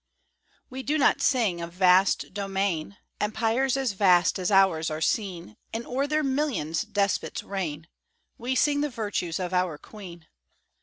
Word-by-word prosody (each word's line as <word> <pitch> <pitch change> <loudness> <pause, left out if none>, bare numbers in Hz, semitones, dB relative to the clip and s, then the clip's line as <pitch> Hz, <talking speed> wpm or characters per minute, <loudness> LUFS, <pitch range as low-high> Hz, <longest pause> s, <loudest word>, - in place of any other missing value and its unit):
We 260 0 -7
do 295 +4 0
not 285 - +3
sing 220 -11 +1
of 170 0 -6
vast 185 +1 +3
domain 195 -2 -2 0.2
Empires 230 +5 0
as 265 -4 0
vast 185 -2 +3
as 180 - -1
ours 190 -5 +4
are 155 0 -4
seen, 170 - -2 0.2
And 230 +1 -4
o'er 270 +3 -1
their 305 +1 0
millions 265 - -1
despots 205 -2 -1
reign; 165 -6 -4 0.5
We 250 +3 -3
sing 290 +3 +2
the 295 - 0
virtues 205 -8 -3
of 180 0 -3
our 180 -4 0
Queen. 175 -3 -12
200 Hz, 150 wpm, -26 LUFS, 175-245 Hz, 0.5 s, ours